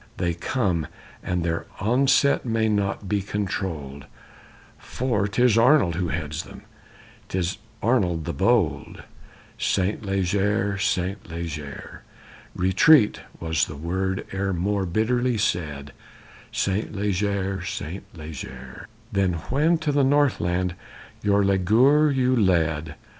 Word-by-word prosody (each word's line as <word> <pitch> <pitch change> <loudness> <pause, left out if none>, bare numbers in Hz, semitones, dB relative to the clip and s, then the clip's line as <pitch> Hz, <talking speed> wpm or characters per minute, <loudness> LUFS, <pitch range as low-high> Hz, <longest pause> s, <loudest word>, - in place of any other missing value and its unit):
They 85 -2 0
come, 85 - -1 0.3
and 90 -1 -2
their 85 0 -2
onset 135 +6 +3
may 115 -2 0
not 100 -1 -1
be 100 +1 0
controlled, 85 -9 -4 0.7
For 115 -6 -1
'tis 115 +2 +3
Arnold 120 - +5
who 90 +2 -1
heads 75 +1 -3
them, - - -13 0.7
'tis 90 0 -2 0.2
Arnold 90 -10 +1
the - - -3
bold_ - - 0 0.6
Saint 95 +3 0
Leger, 100 +1 0
Saint 95 0 -1
Leger! 80 -4 -7 0.5
Retreat! 105 - +4 0.2
Was 80 -2 +1
the 75 - -8
word 95 +5 -2
e'er 95 0 -1
more 95 +2 -1
bitterly 120 +6 +1
said, 75 -8 -2 0.6
Saint 100 +2 -1
Leger, 100 -1 -1
Saint 90 0 -5
Leger, 65 -5 -9 0.2
Than 100 -3 +1 0.2
when 160 +5 +3
to 155 -2 -1
the 140 -1 +2
North 145 0 +3
land 90 +1 0 0.5
your 100 -1 +3
leaguer 115 +11 +4
you 130 -1 +2
led? 80 -7 +1
95 Hz, 115 wpm, -24 LUFS, 85-110 Hz, 0.7 s, Arnold